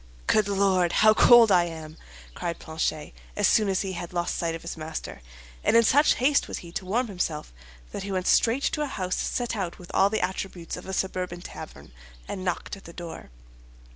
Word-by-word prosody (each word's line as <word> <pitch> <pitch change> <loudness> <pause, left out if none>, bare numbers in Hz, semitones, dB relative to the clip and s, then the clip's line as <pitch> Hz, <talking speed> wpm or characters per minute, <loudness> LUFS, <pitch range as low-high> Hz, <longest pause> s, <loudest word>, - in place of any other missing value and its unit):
"Good 210 - +3
Lord, 190 -3 +2
how 215 0 +6
cold 235 -1 +7
I 175 -2 +5
am!" 160 -2 -8 0.4
cried 170 - -4
Planchet, 160 -1 -3 0.2
as 205 - +3
soon 215 -3 +3
as 190 - +1
he 195 - -3
had 175 0 -6
lost 175 -1 -1
sight 165 -1 -1
of 165 - -9
his 170 - -5
master; 155 - -7 0.4
and - - +4
in 230 - +6
such 290 +6 +4
haste 280 +3 +2
was - - -5
he 170 - -10
to 190 +1 -5
warm 235 +7 +1
himself 165 - -3 0.4
that - - -5
he 195 +1 -5
went 185 -1 -1
straight 245 +4 +3
to 300 - 0
a 295 - 0
house 185 -8 -3
set 240 -2 -2
out 185 -5 -3
with 175 - -12
all 195 - +4
the 220 +1 -1
attributes 185 -2 -6
of 180 - -10
a - - -4
suburban 180 -2 -2
tavern, - - -10 0.4
and 185 - -5
knocked 180 +1 -3
at 195 - -16
the 170 - -11
door. 170 - -8
185 Hz, 210 wpm, -26 LUFS, 170-215 Hz, 0.4 s, cold